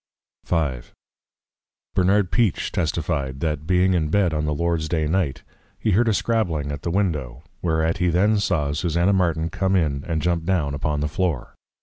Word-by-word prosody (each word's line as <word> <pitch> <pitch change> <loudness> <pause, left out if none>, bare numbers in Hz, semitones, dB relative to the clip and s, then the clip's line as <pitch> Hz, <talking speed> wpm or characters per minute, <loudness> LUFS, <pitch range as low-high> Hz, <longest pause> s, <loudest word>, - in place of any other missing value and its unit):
V. 75 -7 0 1.1
Bernard 95 0 +2
Peache 115 -8 +1
testifi'd, 65 -1 -2
That 75 -1 -2
being 90 +1 +3
in 80 -4 +1
Bed, 90 -1 +2
on 75 0 -1
the 75 - 0
Lord's 85 -1 -1
day 80 -2 0
Night, 80 -3 -1 0.3
he 110 - 0
heard 115 +5 +3
a 110 - +3
scrabbling 85 -13 0
at 70 -1 -5
the - - -3
Window, 75 -9 -1 0.2
whereat 80 -1 0
he 90 - +2
then 100 +5 +3
saw 80 -8 0
Susanna 85 +5 +1
Martin 85 -3 +1
come 95 0 0
in, 75 -6 0
and 80 -2 -2
jump 85 -1 +1
down 85 -5 0
upon 75 +1 -1
the 75 - 0
Floor. 80 -4 -2
85 Hz, 175 wpm, -23 LUFS, 75-95 Hz, 1.1 s, being